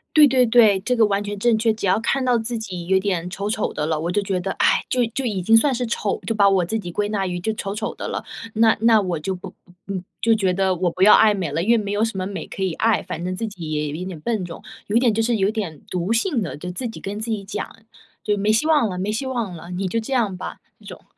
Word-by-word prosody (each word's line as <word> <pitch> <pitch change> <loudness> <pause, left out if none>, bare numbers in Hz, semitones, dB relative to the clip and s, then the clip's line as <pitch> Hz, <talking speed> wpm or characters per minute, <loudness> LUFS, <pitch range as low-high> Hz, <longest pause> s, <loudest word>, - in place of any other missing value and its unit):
对 300 -1 +8
对 255 -2 +4
对， 220 -4 +5
这 250 +4 0
个 225 -2 +5
完 200 0 0
全 205 0 -5
正 235 +1 +3
确。 225 0 +2
只 210 -3 -3
要 195 - +3
看 265 +3 0
到 250 -2 +3
自 230 +1 -3
己 180 -5 -6
有 190 0 +4
点 185 -3 -1
丑 200 +2 -3
丑 215 -1 -1
的 150 - -2
了， 155 -1 0
我 170 +2 -2
就 205 - +1
觉 195 -2 -1
得， 190 +2 -3
哎， - - +2
就 250 -1 +1
就 255 +4 -4
已 205 -6 -1
经 225 +5 +5
算 265 +4 +3
是 245 -1 -2
丑， 210 -3 -2
就 225 - 0
把 200 -1 +5
我 195 -2 +3
自 215 +6 -2
己 175 -5 -6
归 205 +3 -1
纳 200 -2 -1
于 180 -1 -3
就 200 +5 -1
丑 195 -2 -4
丑 210 - -4
的 - - -5
了。 - - -4 0.3
那 225 0 +4
那 225 -2 +5
我 180 -4 -2
就 190 +5 -3
不 180 - -9 0.4
嗯， 190 -2 -4 0.2
就 225 -1 +4
觉 190 -4 +1
得 190 0 +1
我 175 -1 0
不 185 - -7
要 205 +2 +8
爱 220 -1 +5
美 185 -7 -3
了， 165 +4 -1
因 220 - +2
为 235 - +5
没 205 -2 -3
有 215 +2 +2
什 225 - -4
么 185 - -2
美 200 -1 -5
可 195 - -8
以 185 -3 0
爱。 225 +4 +2
反 170 - -6
正 185 0 -2
自 225 +3 -3
己 170 -7 -7
也 150 -1 -1
有 145 - -4
一 180 +3 -5
点 180 -4 -7
笨 215 -1 -1
重， 170 +1 -9 0.2
有 205 - -3
一 235 - +6
点 245 -3 +3
就 225 +1 0
是 230 -1 +1
有 195 +1 +2
点 195 -9 -4
毒 180 +4 -1
性 235 - +1
的。 170 - -5
就 180 +4 -6
自 240 +7 -4
己 225 - -8
跟 200 +2 -5
自 225 +1 -3
己 205 -2 -2
讲， 200 - -6 0.5
就 210 -1 0
没 205 +2 +2
希 225 +9 +2
望 295 -8 +4
了 180 -2 -4
没 200 +3 -1
希 225 +5 -2
望 235 -8 -3
了， 170 +2 -10
你 185 +1 -2
就 230 +5 -1
这 225 +5 -4
样 215 -8 +1
吧， - - -6 0.2
这 - - -19
种。 - - -10
205 Hz, 325 characters per minute, -22 LUFS, 185-225 Hz, 0.5 s, 对